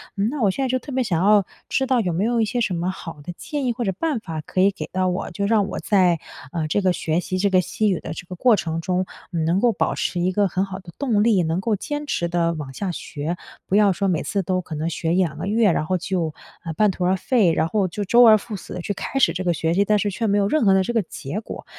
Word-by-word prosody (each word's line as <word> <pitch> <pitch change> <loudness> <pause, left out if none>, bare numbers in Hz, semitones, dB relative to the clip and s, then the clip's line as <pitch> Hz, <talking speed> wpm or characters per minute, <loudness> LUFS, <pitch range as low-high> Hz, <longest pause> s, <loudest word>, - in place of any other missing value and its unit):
那 230 +8 -1
我 195 - +4
现 270 - -2
在 265 - +1
就 255 - +2
特 285 - -10
别 260 -1 +1
想 175 -5 0
要 205 -2 +5 0.2
知 265 - +1
道 260 -2 +3
有 180 - -1
没 185 +6 0
有 235 0 +1
一 220 - +3
些 240 +4 -2
什 195 -5 0
么 175 +2 -1
好 165 -4 -9
的 175 - -6
建 290 -3 -4
议 245 - +2
或 240 - -3
者 195 - +1
办 290 - -1
法 165 -7 -6
可 185 - -4
以 195 - +6
给 - - -6
到 185 0 0
我， 180 +1 -2
就 200 +4 -2
让 210 -2 +2
我 - - -4
在， 180 -5 +3 0.3
呃， 160 -2 -2
这 200 +6 +1
个 185 - +3
学 160 -1 -1
习 185 +1 -3
这 200 +1 +2
个 185 -1 +4
西 215 +4 0
语 185 - 0
的 155 - -6
这 175 - -8
个 180 - -7
过 235 +5 +4
程 165 -4 -3
中， 185 +2 0 0.3
嗯， 165 -2 -1
能 175 +4 +2
够 240 - +4
保 - - -1
持 175 - -2
一 180 +2 +1
个 200 +1 +2
很 185 +2 -1
好 190 -1 -7
的 180 -3 -12
动 225 -7 +2
力， 220 -5 +4
能 165 +2 -1
够 220 0 +1
坚 295 +8 -4
持 175 -11 -1
地 170 -1 +1
往 145 -4 -6
下 190 +6 -3
学， 160 +1 -4 0.3
不 190 - 0
要 205 -1 +5
说 195 +3 -1
每 175 -4 +1
次 200 - -1
都 185 +1 0
可 165 -3 -7
能 155 +2 -2
学 165 0 -1
1-2 165 -6 +1
个 180 - -4
月， 215 -1 +3
然 155 - 0
后 185 +3 0
就， 175 -3 -2 0.3
呃， 165 -2 -4
半 210 +4 +3
途 180 -1 -3
而 185 +1 +3
废， 195 -4 +2
然 160 0 +1
后 195 +1 +1
就 205 +4 -4
周 240 +5 +5
而 220 -1 +8
复 215 +1 -7
始 190 - -9
地 180 - -5
去 205 - -3
开 270 +7 -3
始 - - +5
这 185 - -3
个 175 -1 +1
学 165 0 0
习， 200 +3 +3
但 210 +1 +3
是 205 +1 0
却 225 +4 -2
没 205 0 +2
有 200 - +2
任 255 +1 +2
何 195 - +6
的 190 - +4
这 240 - -3
个 225 - +3
结 145 +2 -6
果。 220 - -8
190 Hz, 320 characters per minute, -22 LUFS, 170-215 Hz, 0.3 s, 而